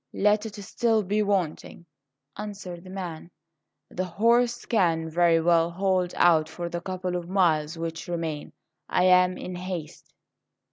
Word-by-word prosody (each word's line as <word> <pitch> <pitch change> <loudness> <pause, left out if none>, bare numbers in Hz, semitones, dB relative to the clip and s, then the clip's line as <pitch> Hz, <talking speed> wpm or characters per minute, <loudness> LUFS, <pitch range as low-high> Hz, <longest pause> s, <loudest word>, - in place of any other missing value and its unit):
"Let 210 +2 +2
it 210 - -10
still 220 +1 0
be 205 +3 0
wanting," 185 -4 -2 0.5
answered 195 -4 -7
the 185 - -12
man; 175 -4 -6 0.6
"the 185 - -2
horse 235 +6 +2
can 165 -7 +1
very 170 0 +4
well 165 0 +3
hold 185 0 0
out 160 -3 +4
for 170 +1 -5
the 170 0 -4
couple 185 0 -4
of 175 -1 -4
miles 165 -4 +2
which 165 0 -5
remain. 165 -3 -4 0.4
I 180 - +2
am 180 0 +5
in 180 - -6
haste." 180 -3 -7
180 Hz, 145 wpm, -26 LUFS, 170-195 Hz, 0.6 s, am